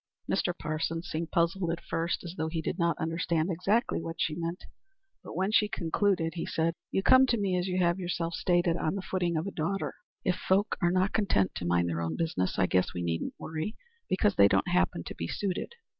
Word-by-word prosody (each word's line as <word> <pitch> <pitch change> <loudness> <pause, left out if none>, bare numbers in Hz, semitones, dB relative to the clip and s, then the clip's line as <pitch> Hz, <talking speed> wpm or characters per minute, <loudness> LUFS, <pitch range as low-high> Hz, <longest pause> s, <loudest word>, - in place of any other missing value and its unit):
Mr. - - +1
Parsons 160 +3 -2
seemed 165 -1 -3
puzzled 170 +1 +1
at 170 0 -1
first, 165 +1 -2
as 170 -1 -6
though 160 -2 -1
he 160 0 -2
did 160 - -3
not 170 -2 +2
understand 165 +1 0
exactly 195 +5 +1
what 165 0 -6
she 155 - +1
meant, 170 +2 -4 0.6
but - - -9
when 190 +4 0
she 210 -1 +4
concluded 170 -1 0
he 170 - -3
said: 165 +1 0 0.2
"You 195 - 0
come 260 +3 +7
to 235 - +2
me, 195 -3 0
as 180 +1 0
you 180 0 -1
have 175 0 +2
yourself 175 -2 -2
stated, 175 -1 +2
on 155 - -1
the 195 - -4
footing 175 -4 0
of 160 - -1
a 200 - -3
daughter. 190 +5 -2 0.3
If 180 -1 +2
folk 195 +3 +1
are 175 - +4
not 185 +2 +1
content 180 - +2
to 85 - -4
mind 85 0 +2
their 85 -1 -2
own 80 -1 -2
business, 125 - -1
I 95 - +4
guess 90 0 +1
we 90 - -2
needn't 85 -1 -2
worry 160 +7 -4 0.3
because 200 +2 +3
they 100 - +8
don't 95 -1 +2
happen 90 -1 +1
to - - -7
be 85 - -4
suited. 190 - -3
170 Hz, 220 wpm, -29 LUFS, 160-185 Hz, 0.6 s, they